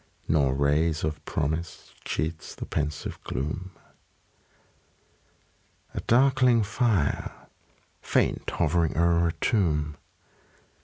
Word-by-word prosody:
Nor 70 Hz, -4 st, +2 dB
ray 70 Hz, +3 st, +3 dB, 0.2 s
of 75 Hz, 0 st, -3 dB
promise 80 Hz, +2 st, -3 dB
cheats 80 Hz, +1 st, -3 dB
the -, -, -6 dB
pensive 75 Hz, 0 st, -3 dB
gloom. 75 Hz, +8 st, -4 dB, 2.2 s
A -, -, -3 dB
darkling 125 Hz, -2 st, +4 dB
fire, 105 Hz, -, 0 dB, 0.7 s
faint -, -, 0 dB
hovering 85 Hz, -3 st, +1 dB
o'er 85 Hz, 0 st, +3 dB
a -, -, +1 dB
tomb. 75 Hz, -9 st, 0 dB
80 Hz, 90 wpm, -27 LUFS, 75-100 Hz, 2.2 s, darkling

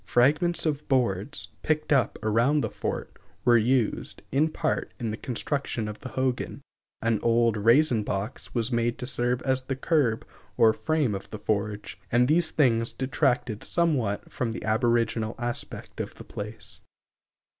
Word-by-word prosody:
Fragments 150 Hz, +9 st, +3 dB
of 150 Hz, -2 st, -1 dB
boards, 125 Hz, -1 st, 0 dB
picked 155 Hz, -1 st, +1 dB
up 130 Hz, -6 st, +2 dB
around 120 Hz, +8 st, +3 dB
the -, -, -2 dB
fort, -, -, -4 dB, 0.3 s
were 120 Hz, -1 st, +6 dB
used, 120 Hz, 0 st, +1 dB
in 150 Hz, +4 st, +3 dB
part, 155 Hz, 0 st, -1 dB
in 115 Hz, -3 st, -3 dB
the -, -, -2 dB
construction 125 Hz, -1 st, -2 dB
of 105 Hz, 0 st, -6 dB
the 130 Hz, -, -7 dB
hogan, 130 Hz, -1 st, -2 dB, 0.4 s
an 115 Hz, -2 st, +2 dB
old 115 Hz, -1 st, +3 dB
raisin 115 Hz, +3 st, +4 dB
box 105 Hz, +3 st, -4 dB
was 120 Hz, +1 st, 0 dB
made 120 Hz, 0 st, +1 dB
to -, -, -5 dB
serve 125 Hz, -1 st, -1 dB
as 130 Hz, -1 st, +1 dB
the 135 Hz, +1 st, -3 dB
curb 135 Hz, -5 st, +1 dB, 0.3 s
or 110 Hz, -1 st, +6 dB
frame 155 Hz, -7 st, 0 dB
of 95 Hz, -, -6 dB
the 110 Hz, -, -6 dB
forge, 105 Hz, -1 st, -2 dB
and 125 Hz, +1 st, +4 dB
these 160 Hz, +3 st, +3 dB
things 115 Hz, -6 st, +2 dB
detracted 130 Hz, -4 st, 0 dB
somewhat 140 Hz, -, 0 dB
from 115 Hz, -3 st, -2 dB
the -, -, -6 dB
aboriginal 115 Hz, 0 st, +1 dB
aspect 120 Hz, 0 st, -4 dB
of -, -, -6 dB
the -, -, -10 dB
place. 105 Hz, +2 st, -8 dB
120 Hz, 155 wpm, -27 LUFS, 110-135 Hz, 0.4 s, were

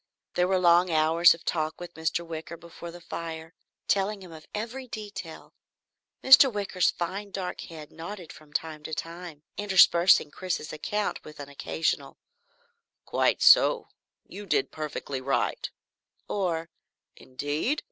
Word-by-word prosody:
There 180 Hz, 0 st, +2 dB
were 190 Hz, 0 st, +2 dB
long 175 Hz, 0 st, +5 dB
hours 165 Hz, +2 st, +5 dB
of 165 Hz, -, -18 dB
talk 155 Hz, -1 st, -1 dB
with 175 Hz, 0 st, -8 dB
Mr. 160 Hz, +1 st, -2 dB
Wicker 165 Hz, 0 st, -7 dB
before 170 Hz, +1 st, -10 dB
the 175 Hz, +1 st, -10 dB
fire, 165 Hz, 0 st, -6 dB, 0.3 s
telling 200 Hz, 0 st, 0 dB
him 180 Hz, -, -11 dB
of 160 Hz, -1 st, -12 dB
every 240 Hz, +5 st, -5 dB
detail. 205 Hz, -7 st, -8 dB, 0.7 s
Mr. 265 Hz, 0 st, +9 dB
Wicker's 200 Hz, -4 st, +1 dB
fine 195 Hz, +4 st, -4 dB
dark 190 Hz, -2 st, -4 dB
head 155 Hz, -3 st, -10 dB
nodded 175 Hz, +1 st, -8 dB
from 150 Hz, 0 st, -17 dB
time 160 Hz, 0 st, -3 dB
to 160 Hz, -, -4 dB
time, 165 Hz, -2 st, -7 dB
interspersing 185 Hz, -5 st, +5 dB
Chris's 180 Hz, -3 st, -4 dB
account 205 Hz, +7 st, -2 dB
with 150 Hz, 0 st, -12 dB
an 140 Hz, 0 st, -7 dB
occasional 160 Hz, +3 st, -2 dB, 0.9 s
"Quite -, -, +1 dB
so 485 Hz, -, +6 dB, 0.4 s
you 205 Hz, 0 st, -10 dB
did 135 Hz, -6 st, +1 dB
perfectly 150 Hz, -3 st, -5 dB
right," 135 Hz, +1 st, -1 dB, 0.6 s
or, 170 Hz, -4 st, -2 dB, 0.4 s
"Indeed? 145 Hz, -, -2 dB
170 Hz, 135 wpm, -27 LUFS, 160-190 Hz, 0.9 s, Mr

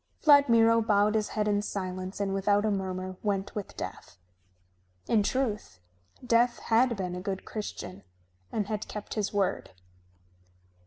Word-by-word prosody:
Vladmiro 230 Hz, -6 st, +6 dB
bowed 210 Hz, -1 st, +3 dB
his 215 Hz, -1 st, +1 dB
head 210 Hz, -1 st, -1 dB
in 205 Hz, -1 st, +2 dB
silence 185 Hz, -2 st, -5 dB
and 195 Hz, -1 st, -1 dB
without 205 Hz, +2 st, +2 dB
a 215 Hz, -, +2 dB
murmur 185 Hz, -1 st, -3 dB
went 200 Hz, -2 st, -1 dB
with 205 Hz, -2 st, -6 dB
Death. 90 Hz, -, -7 dB, 0.9 s
In 220 Hz, -, +3 dB
truth, 210 Hz, -, -2 dB, 0.5 s
Death 240 Hz, 0 st, +3 dB
had 235 Hz, +1 st, +2 dB
been 180 Hz, -2 st, -3 dB
a 180 Hz, -, -5 dB
good 190 Hz, 0 st, -4 dB
Christian 210 Hz, -3 st, -6 dB, 0.5 s
and 210 Hz, -, -1 dB
had 210 Hz, 0 st, -4 dB
kept 210 Hz, -1 st, -6 dB
his 210 Hz, -2 st, -1 dB
word. 200 Hz, -, -1 dB
205 Hz, 145 wpm, -28 LUFS, 195-225 Hz, 0.9 s, Vladmiro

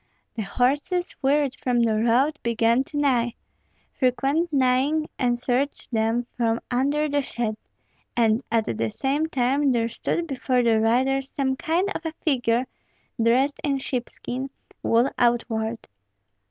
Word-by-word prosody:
The 225 Hz, -, -2 dB
horses, 285 Hz, -, 0 dB
wearied 280 Hz, -1 st, +2 dB
from 245 Hz, -2 st, +1 dB
the 230 Hz, -2 st, +2 dB
road, 245 Hz, +7 st, +2 dB
began 235 Hz, +2 st, +2 dB
to 295 Hz, -, -7 dB
neigh; 245 Hz, -5 st, +1 dB, 0.6 s
frequent 275 Hz, +6 st, +1 dB
neighing 275 Hz, +3 st, +2 dB
answered 250 Hz, +2 st, +1 dB, 0.2 s
them 225 Hz, +1 st, +1 dB
from 230 Hz, -1 st, +1 dB
under 285 Hz, +5 st, +1 dB
the 290 Hz, 0 st, +1 dB
shed, 235 Hz, -4 st, -3 dB, 0.6 s
and 225 Hz, +1 st, +3 dB
at 225 Hz, -1 st, +2 dB
the 115 Hz, 0 st, -1 dB
same 280 Hz, -, -1 dB
time 275 Hz, 0 st, +1 dB
there 230 Hz, -2 st, +1 dB
stood 335 Hz, +8 st, -2 dB
before 260 Hz, -4 st, 0 dB
the 225 Hz, -2 st, +3 dB
riders 260 Hz, +4 st, +1 dB
some 265 Hz, -2 st, -1 dB
kind 335 Hz, +7 st, 0 dB
of -, -, -5 dB
a 320 Hz, -1 st, -4 dB
figure, 250 Hz, -6 st, 0 dB, 0.6 s
dressed 255 Hz, +5 st, +2 dB
in 280 Hz, -2 st, +1 dB
sheepskin, 260 Hz, 0 st, -4 dB, 0.3 s
wool 235 Hz, +4 st, +2 dB
outward. 230 Hz, -1 st, +1 dB
255 Hz, 135 wpm, -24 LUFS, 235-280 Hz, 0.6 s, and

